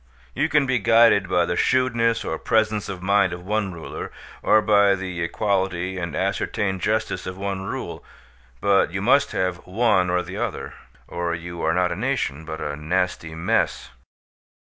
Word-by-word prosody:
You 160 Hz, -, 0 dB
can 145 Hz, -2 st, +3 dB
be 130 Hz, -2 st, +1 dB
guided 115 Hz, -3 st, +5 dB
by 85 Hz, -2 st, +3 dB
the 85 Hz, -, -2 dB
shrewdness 115 Hz, -2 st, +1 dB
or 80 Hz, -, -3 dB
presence 110 Hz, -2 st, +1 dB
of 95 Hz, -2 st, -6 dB
mind 100 Hz, -1 st, +3 dB
of 90 Hz, 0 st, -8 dB
one 105 Hz, -1 st, -1 dB
ruler, 85 Hz, -2 st, -7 dB, 0.3 s
or 110 Hz, -, +5 dB
by 100 Hz, -1 st, +4 dB
the 90 Hz, -2 st, -5 dB
equality 95 Hz, 0 st, -1 dB
and 85 Hz, -3 st, -4 dB
ascertained 95 Hz, -2 st, -1 dB
justice 110 Hz, -3 st, -1 dB
of 90 Hz, 0 st, -6 dB
one 95 Hz, -1 st, -3 dB
rule; -, -, -5 dB, 0.6 s
but 100 Hz, -3 st, +3 dB
you 95 Hz, -, -3 dB
must 140 Hz, +6 st, +4 dB
have 90 Hz, -2 st, 0 dB
one 95 Hz, -1 st, +1 dB
or 90 Hz, 0 st, +1 dB
the -, -, -7 dB
other, -, -, -4 dB, 0.3 s
or 85 Hz, -1 st, -2 dB
you 85 Hz, 0 st, -7 dB
are 80 Hz, -, +1 dB
not 90 Hz, -1 st, +2 dB
a -, -, -2 dB
nation, 75 Hz, +4 st, -2 dB
but 80 Hz, 0 st, -6 dB
a 75 Hz, -, -3 dB
nasty 80 Hz, +1 st, -2 dB
mess. 80 Hz, -, 0 dB
95 Hz, 170 wpm, -23 LUFS, 85-105 Hz, 0.6 s, guided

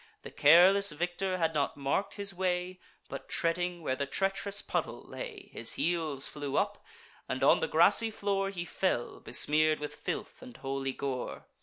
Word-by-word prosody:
The -, -, -9 dB
careless 180 Hz, +6 st, +6 dB
victor 175 Hz, +4 st, -2 dB
had 165 Hz, -2 st, 0 dB
not 145 Hz, -2 st, -1 dB
mark'd 140 Hz, +8 st, -1 dB
his 200 Hz, -1 st, -5 dB
way; 180 Hz, 0 st, -2 dB, 0.3 s
But, -, -, -8 dB
treading 175 Hz, +1 st, 0 dB
where 130 Hz, -, 0 dB
the 140 Hz, +1 st, -3 dB
treach'rous 195 Hz, +5 st, -1 dB
puddle -, -, -3 dB
lay, 450 Hz, -6 st, -8 dB
His -, -, -2 dB
heels 160 Hz, -5 st, 0 dB
flew 145 Hz, -2 st, -4 dB
up; 205 Hz, 0 st, -1 dB, 0.5 s
and -, -, -2 dB
on -, -, +6 dB
the 485 Hz, -, -1 dB
grassy 230 Hz, -, +5 dB
floor 200 Hz, -2 st, -1 dB
He 175 Hz, -3 st, -5 dB
fell, 175 Hz, -10 st, -1 dB
besmear'd 155 Hz, +5 st, +2 dB
with 150 Hz, 0 st, -5 dB
filth -, -, -5 dB
and 120 Hz, -, -11 dB
holy 135 Hz, 0 st, -3 dB
gore. 130 Hz, -2 st, -4 dB
175 Hz, 165 wpm, -30 LUFS, 145-195 Hz, 0.5 s, careless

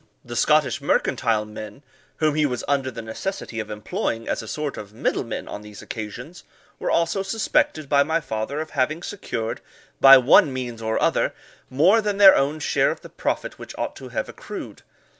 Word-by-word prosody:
The 120 Hz, 0 st, -7 dB
Scottish 150 Hz, +3 st, +2 dB
mercantile 115 Hz, -5 st, +1 dB
men, 110 Hz, +6 st, -9 dB, 0.3 s
whom 155 Hz, -1 st, +2 dB
he 155 Hz, +1 st, +1 dB
was 125 Hz, -3 st, -4 dB
under 140 Hz, -2 st, +1 dB
the 115 Hz, -2 st, -7 dB
necessity 115 Hz, -, -5 dB
of 110 Hz, -, -5 dB
employing 115 Hz, +2 st, -3 dB
as -, -, -1 dB
a 110 Hz, -, -10 dB
sort 150 Hz, +2 st, -3 dB
of 105 Hz, 0 st, -9 dB
middle -, -, 0 dB
men 115 Hz, -, -6 dB
on 105 Hz, -, -7 dB
these 105 Hz, -1 st, -11 dB
occasions, 120 Hz, +10 st, -7 dB, 0.4 s
were -, -, -2 dB
also 170 Hz, +4 st, +1 dB
suspected 225 Hz, -, 0 dB
by 140 Hz, 0 st, +4 dB
my 160 Hz, +3 st, +1 dB
father 125 Hz, 0 st, -4 dB
of 155 Hz, -, -7 dB
having 155 Hz, +5 st, -1 dB
secured, 115 Hz, -, -4 dB, 0.4 s
by 135 Hz, 0 st, +10 dB
one 130 Hz, +2 st, +5 dB
means 125 Hz, -3 st, -5 dB
or 110 Hz, 0 st, -1 dB
other, -, -, +1 dB, 0.3 s
more 180 Hz, -, +4 dB
than 205 Hz, -2 st, -1 dB
their 195 Hz, -1 st, +9 dB
own 145 Hz, +3 st, 0 dB
share 150 Hz, -, +2 dB
of -, -, -4 dB
the -, -, -11 dB
profit -, -, -3 dB
which -, -, -10 dB
ought -, -, -3 dB
to -, -, -9 dB
have -, -, -3 dB
accrued. -, -, -8 dB
135 Hz, 190 wpm, -23 LUFS, 115-155 Hz, 0.4 s, by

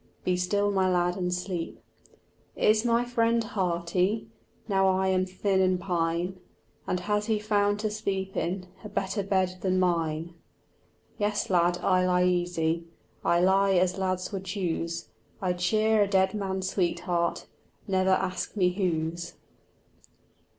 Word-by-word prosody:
Be 180 Hz, -, +1 dB
still, 200 Hz, +3 st, +1 dB
my 190 Hz, -1 st, +2 dB
lad, 180 Hz, 0 st, +1 dB
and 180 Hz, -2 st, -2 dB
sleep. 180 Hz, -1 st, -4 dB, 0.8 s
"Is 215 Hz, +1 st, +3 dB
my 235 Hz, 0 st, +2 dB
friend 230 Hz, -1 st, +1 dB
hearty, 185 Hz, 0 st, 0 dB, 0.4 s
Now 195 Hz, -2 st, +3 dB
I 190 Hz, 0 st, +2 dB
am 185 Hz, 0 st, +1 dB
thin 190 Hz, +1 st, 0 dB
and 185 Hz, -1 st, +2 dB
pine, 175 Hz, 0 st, -1 dB, 0.5 s
And 180 Hz, -, -1 dB
has 210 Hz, +2 st, -1 dB
he 220 Hz, -2 st, +2 dB
found 205 Hz, -1 st, +1 dB
to 215 Hz, -1 st, -1 dB
sleep 195 Hz, -2 st, -3 dB
in 180 Hz, +2 st, -2 dB, 0.2 s
A 210 Hz, -, -7 dB
better 195 Hz, +1 st, -2 dB
bed 190 Hz, -2 st, 0 dB
than 185 Hz, -1 st, +1 dB
mine?" 165 Hz, -2 st, 0 dB, 0.9 s
Yes, 205 Hz, -1 st, 0 dB
lad, 175 Hz, 0 st, +3 dB
I 185 Hz, 0 st, +3 dB
lie 180 Hz, 0 st, +3 dB
easy, 175 Hz, -2 st, 0 dB, 0.4 s
I 170 Hz, 0 st, +3 dB
lie 195 Hz, +1 st, +4 dB
as 185 Hz, +1 st, +2 dB
lads 185 Hz, 0 st, -1 dB
would 190 Hz, -2 st, -5 dB
choose; 170 Hz, -3 st, -3 dB, 0.3 s
I 185 Hz, -3 st, 0 dB
cheer 215 Hz, +4 st, +2 dB
a 205 Hz, -, +3 dB
dead 190 Hz, -1 st, +2 dB
man's 190 Hz, -2 st, -2 dB
sweetheart, 175 Hz, -2 st, -1 dB, 0.4 s
Never 190 Hz, -1 st, +2 dB
ask 190 Hz, +1 st, 0 dB
me 180 Hz, -2 st, +3 dB
whose. 170 Hz, -2 st, -2 dB
185 Hz, 145 wpm, -27 LUFS, 180-200 Hz, 0.9 s, lie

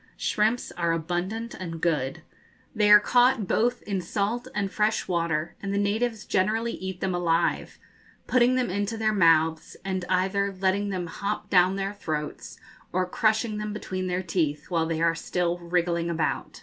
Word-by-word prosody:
Shrimps 220 Hz, +3 st, 0 dB
are 170 Hz, -1 st, 0 dB
abundant 180 Hz, +8 st, -3 dB
and 165 Hz, -3 st, -6 dB
good. 150 Hz, -6 st, -1 dB, 0.5 s
They 210 Hz, -2 st, +2 dB
are 210 Hz, 0 st, +10 dB
caught 245 Hz, -3 st, +3 dB
both 240 Hz, +5 st, +1 dB
in 195 Hz, -3 st, -2 dB
salt 210 Hz, +7 st, -2 dB
and 200 Hz, -2 st, -1 dB
fresh 215 Hz, +1 st, 0 dB
water, 170 Hz, -3 st, -1 dB
and 200 Hz, -, -3 dB
the 200 Hz, -, 0 dB
natives 215 Hz, +2 st, 0 dB
generally 220 Hz, +5 st, +1 dB
eat 190 Hz, -3 st, -6 dB
them 190 Hz, -1 st, 0 dB
alive, 170 Hz, -1 st, 0 dB, 0.5 s
putting 255 Hz, 0 st, +3 dB
them 250 Hz, -6 st, 0 dB
into 205 Hz, +3 st, -2 dB
their 215 Hz, -1 st, +1 dB
mouths, 160 Hz, -4 st, +3 dB
ana 190 Hz, -1 st, -1 dB
either 195 Hz, +2 st, +1 dB
letting 195 Hz, +2 st, +1 dB
them 185 Hz, -2 st, -2 dB
hop 205 Hz, +4 st, -4 dB
down 185 Hz, 0 st, +5 dB
their 195 Hz, +1 st, -2 dB
throats, 155 Hz, -6 st, -5 dB, 0.3 s
or 185 Hz, +1 st, +1 dB
crushing 215 Hz, +3 st, 0 dB
them 210 Hz, 0 st, -4 dB
between 185 Hz, -3 st, -4 dB
their 180 Hz, +1 st, -1 dB
teeth 160 Hz, -3 st, -2 dB
while 165 Hz, -2 st, +1 dB
they 165 Hz, 0 st, -1 dB
are 165 Hz, 0 st, +4 dB
still 175 Hz, +1 st, -1 dB
wriggling 170 Hz, -1 st, 0 dB
about. 160 Hz, -2 st, -2 dB
190 Hz, 165 wpm, -26 LUFS, 170-210 Hz, 0.5 s, are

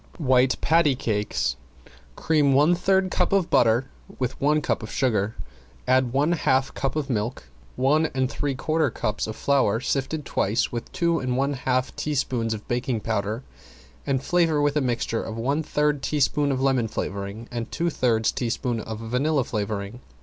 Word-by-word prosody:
~WHITE 130 Hz, -3 st, +3 dB
PATTY 160 Hz, -3 st, +3 dB
CAKES~ 105 Hz, -, -1 dB, 0.6 s
Cream 150 Hz, -4 st, +2 dB
one 150 Hz, +6 st, +5 dB
third 190 Hz, +1 st, +2 dB
cup 180 Hz, -, +1 dB
of 195 Hz, -3 st, +1 dB
butter 115 Hz, +2 st, +4 dB, 0.3 s
with 130 Hz, 0 st, -3 dB
one 150 Hz, +2 st, +3 dB
cup 150 Hz, -, -1 dB
of 110 Hz, -, -7 dB
sugar, 110 Hz, -5 st, 0 dB, 0.5 s
add 130 Hz, -1 st, +3 dB
one 145 Hz, +5 st, +2 dB
half 135 Hz, -5 st, +1 dB
cup 135 Hz, 0 st, -2 dB
of 150 Hz, -3 st, -1 dB
milk, 115 Hz, -, -2 dB, 0.3 s
one 150 Hz, +5 st, +3 dB
and 130 Hz, -2 st, -1 dB
three 140 Hz, +1 st, -2 dB
quarter 155 Hz, +4 st, +1 dB
cups 105 Hz, 0 st, -2 dB
of 110 Hz, -, -5 dB
flour 130 Hz, -6 st, +2 dB
sifted 135 Hz, +3 st, -2 dB
twice 110 Hz, +1 st, 0 dB
with 120 Hz, -1 st, -5 dB
two 170 Hz, -2 st, +1 dB
and 130 Hz, -1 st, -1 dB
one 140 Hz, +2 st, +1 dB
half 130 Hz, -1 st, 0 dB
level -, -, -19 dB
teaspoons 125 Hz, -6 st, -1 dB
of 105 Hz, -, -11 dB
baking 120 Hz, -2 st, -1 dB
powder, 110 Hz, +2 st, -2 dB, 0.6 s
and 135 Hz, -1 st, 0 dB
flavor 165 Hz, -3 st, +2 dB
with 145 Hz, 0 st, +1 dB
a 150 Hz, -, +2 dB
mixture 120 Hz, -3 st, -1 dB
of 110 Hz, 0 st, -6 dB
one 140 Hz, +7 st, 0 dB
third 150 Hz, -2 st, 0 dB
teaspoon 145 Hz, 0 st, +1 dB
of 130 Hz, -, -1 dB
lemon 130 Hz, -3 st, +2 dB
flavoring 100 Hz, +1 st, -5 dB
and 120 Hz, -1 st, -4 dB
two 170 Hz, 0 st, -1 dB
thirds 115 Hz, -5 st, +1 dB
teaspoon 120 Hz, 0 st, -2 dB
of 110 Hz, 0 st, -6 dB
vanilla 130 Hz, +6 st, 0 dB
flavoring. 105 Hz, +1 st, -4 dB
130 Hz, 170 wpm, -24 LUFS, 115-145 Hz, 0.6 s, one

